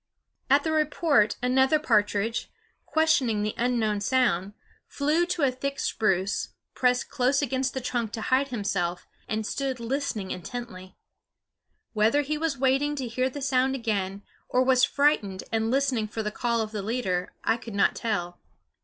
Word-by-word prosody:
At 280 Hz, +2 st, +5 dB
the 320 Hz, -, -1 dB
report 305 Hz, -7 st, +2 dB
another 265 Hz, +4 st, +4 dB
partridge, 220 Hz, -5 st, +1 dB, 0.4 s
questioning 275 Hz, -10 st, +2 dB
the 210 Hz, -, -1 dB
unknown 230 Hz, -4 st, 0 dB
sound, 205 Hz, -6 st, +1 dB, 0.3 s
flew 310 Hz, +5 st, +1 dB
to 355 Hz, -4 st, -1 dB
a 270 Hz, -, +4 dB
thick 275 Hz, +2 st, -4 dB
spruce, 195 Hz, -1 st, 0 dB, 0.2 s
pressed 250 Hz, 0 st, +1 dB
close 275 Hz, +2 st, +2 dB
against 265 Hz, 0 st, -1 dB
the 265 Hz, -, -2 dB
trunk 235 Hz, -3 st, -2 dB
to 225 Hz, -, -4 dB
hide 260 Hz, +4 st, +2 dB
himself, 195 Hz, -7 st, -2 dB, 0.2 s
and 220 Hz, 0 st, -2 dB
stood 265 Hz, +2 st, -2 dB
listening 235 Hz, -5 st, -2 dB
intently. 185 Hz, -2 st, -7 dB, 1.0 s
Whether 225 Hz, +7 st, +3 dB
he 300 Hz, +2 st, -2 dB
was 320 Hz, -3 st, -1 dB
waiting 270 Hz, +3 st, +2 dB
to 265 Hz, -3 st, -3 dB
hear 255 Hz, +3 st, 0 dB
the 280 Hz, +1 st, -7 dB
sound 265 Hz, 0 st, +2 dB
again, 200 Hz, -5 st, -2 dB, 0.3 s
or 255 Hz, -, +3 dB
was 255 Hz, -1 st, +3 dB
frightened 270 Hz, -12 st, +2 dB
and 225 Hz, 0 st, 0 dB
listening 260 Hz, -4 st, +1 dB
for 220 Hz, +1 st, -4 dB
the 210 Hz, -, -2 dB
call 235 Hz, +1 st, 0 dB
of 215 Hz, -1 st, -4 dB
the 210 Hz, -2 st, -3 dB
leader, 195 Hz, -5 st, -2 dB
I 225 Hz, -, +2 dB
could 230 Hz, -3 st, -9 dB
not 200 Hz, -, +3 dB
tell. 175 Hz, -6 st, -3 dB
245 Hz, 160 wpm, -26 LUFS, 210-275 Hz, 1.0 s, At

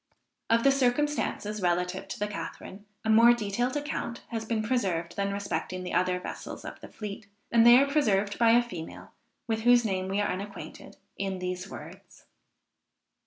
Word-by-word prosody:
Of 230 Hz, 0 st, +3 dB
the 275 Hz, -, +6 dB
circumstances 255 Hz, -5 st, 0 dB
relative 180 Hz, +1 st, 0 dB
to 195 Hz, -, -6 dB
the 210 Hz, -, -1 dB
Catharine, 205 Hz, 0 st, -7 dB, 0.2 s
a -, -, 0 dB
more 230 Hz, +2 st, +7 dB
detailed 240 Hz, +4 st, -1 dB
account 290 Hz, -5 st, -4 dB
has 225 Hz, -1 st, -4 dB
been 220 Hz, -1 st, -1 dB
preserved 190 Hz, -8 st, -1 dB
than 200 Hz, 0 st, -1 dB
respecting 200 Hz, -2 st, -3 dB
the 180 Hz, -, -5 dB
other 180 Hz, +1 st, +1 dB
vessels -, -, -7 dB
of -, -, -8 dB
the -, -, -10 dB
fleet; 210 Hz, -1 st, -8 dB, 0.2 s
and 235 Hz, 0 st, +6 dB
they 240 Hz, +1 st, +10 dB
are 275 Hz, -, +5 dB
preserved 210 Hz, -9 st, +1 dB
by 230 Hz, -1 st, +6 dB
a 240 Hz, -, +3 dB
female, 175 Hz, -9 st, -9 dB, 0.3 s
with 225 Hz, -2 st, -1 dB
whose 240 Hz, 0 st, +5 dB
name 190 Hz, -3 st, -1 dB
we 195 Hz, +2 st, -1 dB
are 205 Hz, -, +1 dB
unacquainted, 200 Hz, +2 st, -8 dB, 0.2 s
in 195 Hz, -1 st, -2 dB
these 180 Hz, 0 st, -4 dB
words. -, -, -12 dB
210 Hz, 170 wpm, -28 LUFS, 190-240 Hz, 0.3 s, they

